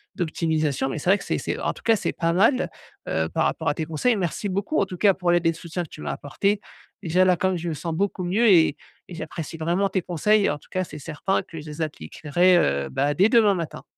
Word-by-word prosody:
d'optimisation. 155 -6 -1
Mais 135 - -4
c'est 155 - -2
vrai 200 - +5
que - - -8
c'est - - -1
c'est - - -3
en - - -1
tout - - -15
cas 225 - +4
c'est - - -2
pas 165 -1 0
mal, 225 +9 +3 0.4
heu, 80 0 0
par - - 0
rapport - - -2
à - - +1
tes 160 - -3
conseils. 165 +10 +1
Merci 195 +1 -2
beaucoup 200 +10 -1
en 200 - +2
tout 185 -2 -8
cas 200 +1 +4
pour 180 -1 -2
l'aide 175 0 +2
et - - +5
le - - 0
soutien 170 +1 -5
que 160 - -11
tu 150 - -11
m'as - - -3
apporté. 195 +9 -1 0.4
Déjà 180 +2 +3
là, 185 -1 +4
comme 185 +1 0
je 170 +1 -5
me - - -2
sens 160 +3 -4
beaucoup 185 +2 -1
mieux 200 +7 +2
et 165 -7 +5 0.3
et - - -8
j'apprécie 165 -1 -6
vraiment 175 +5 0
tes 190 - -1
conseils. 200 +5 +2
En 145 - -2
tout - - -22
cas 185 - 0
c'est 150 - -10
certain 165 +6 -1
que 165 - -9
je 150 - -10
les 150 +2 -7
appliquerai, 155 - +1
heu, 70 - +1
bah 140 +2 0
dès 185 +8 +4
demain 225 -4 +5
matin. 170 -4 -5
175 Hz, 260 wpm, -24 LUFS, 155-195 Hz, 0.4 s, vrai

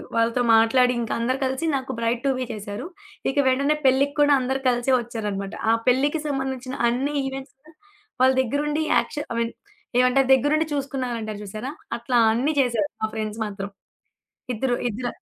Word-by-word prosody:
వాళ్ళతో 230 +2 +2
మాట్లాడింకా, 240 +1 +3
అందరూ 255 +3 0
కలిసి 265 +4 -2
నాకు 265 -1 -3
బ్రైట్ 230 +1 -1
టు 275 - +3
బీ 255 - -1
చేశారు. 205 +2 -6 0.5
ఇక 270 - -10
వెంటనే 280 +3 +2
పెళ్ళిక్కుడా 285 +2 +4
అందరూ 265 +1 -1
కలిసే 245 +2 +1
వచ్చారనమాట. 210 -4 -4 0.2
ఆ - - +5
పెళ్ళికి 285 +5 +2
సంబంధించిన 265 -2 -3 0.2
అన్ని 265 +5 -1
ఈవెంట్స్ 270 +1 -6 0.7
వాళ్ళ 260 0 +6
దెగ్గరుండి, 295 +5 -1
యాక్షన్ 295 - -2
ఐ - - -4
మీన్ 230 0 -2 0.5
ఏవంతారు 255 +1 +4
దగ్గరుండి 290 +4 +3
చూసుకున్నారంటారు 250 -6 -3
చూసారా, 215 +7 -5 0.3
అట్లా 235 +1 +1
అన్నీ 265 +7 +1
చేశారు, 235 -6 0
మా 220 - +1
ఫ్రెండ్స్ 215 0 -4
మాత్రం. 200 -1 -6 0.8
ఇద్దరు 245 +2 0
ఇద్దర 240 +3 -3
255 Hz, 145 wpm, -24 LUFS, 230-270 Hz, 0.8 s, వాళ్ళ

